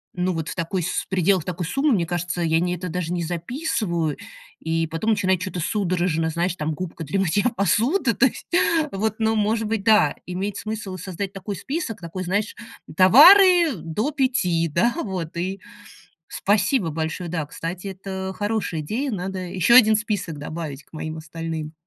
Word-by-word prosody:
Ну, 180 +1 0
вот 165 +1 -4
в - - -5
такой 180 +1 -2
с 170 - -2
в - - -22
пределах 185 -2 +2
такой 180 -1 -3
суммы, 275 +5 +1
мне 175 -5 +1
кажется, 175 0 -3
я 160 -1 +2
не 180 +1 0
это, 180 +1 -6
даже 175 0 -3
не 175 -1 -1
записываю, 175 - -2 0.4
и 165 0 -1
потом 165 +8 -1
начинаю 190 -3 +2
чё-то 185 0 -5
судорожно, 175 -3 0
знаешь, 170 +2 -1
там, 155 -1 -2
губка 170 0 -6
для 160 +6 -2
мытья 195 +2 +1
посуды, 230 - +2
то 270 - +3
есть, 265 - -3 0.4
вот, 215 +2 -1
ну, 220 0 +2
может 215 +1 0
быть, 220 -2 -2
да, 210 -9 +4
имеет 190 +3 -4
смысл 215 -3 -5
и - - -7
создать 190 +2 -5
такой 195 0 -6
список, 270 - -4
такой, 180 +2 -5
знаешь, 205 +4 -1 0.4
"товары 340 - +8
до 175 - -3
5", 240 - +1
да, 185 +10 +1
вот, 175 -5 -5
и 190 +3 -3 0.7
спасибо 205 -1 +1
большое. 160 +2 -3
Да, 160 -3 -2
кстати, 170 +6 -6
это 190 0 -5
хорошая 205 -6 -2
идея, 240 - -2
надо 190 -1 -4
еще 185 +5 +2
1 220 -3 +7
список 205 -8 -2
добавить 150 -2 -6
к - - -33
моим 155 +1 -5
остальным. 160 0 -6
185 Hz, 175 wpm, -23 LUFS, 165-215 Hz, 0.7 s, товары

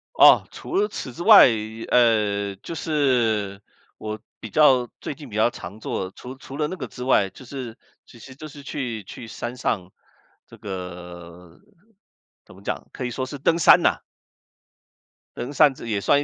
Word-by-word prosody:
哦， - - +7
除 365 - -6
了 415 +1 +2
此 130 - -7
之 170 - -7
外， 215 0 +9 0.4
呃， 105 -4 +2
就 165 - -8
是 120 -11 0 0.4
我 110 0 -5 0.2
比 110 - -8
较 130 -5 +4
最 - - -5
近 145 -3 -12
比 105 - -7
较 110 +2 +3
常 100 +1 -9
做 95 -3 -3
除 125 +6 -10
除 135 +1 -10
了 150 0 0
那 185 - -5
个 130 -7 -6
之 125 - -8
外， 100 -7 +3
就 130 - -14
是， 125 -3 -7 0.3
其 120 - -17
实 130 +3 -12
就 155 +3 -9
是 145 0 -12
去 120 -8 -5
去 115 +4 -10
山 120 +2 -6
上 95 -7 -2 0.5
这 - - -15
个 90 -2 -9 0.8
怎 - - -16
么 - - -16
讲， - - -4
可 130 - -6
以 125 - -2
说 130 +1 -3
是 145 +1 -7
登 165 +5 +2
山 - - +7
呐。 - - +2 1.4
登 125 +4 -5
山 145 -2 +5
这 115 - -10
也 105 -3 -1
算 140 - +3
120 Hz, 190 characters per minute, -23 LUFS, 100-140 Hz, 1.4 s, 外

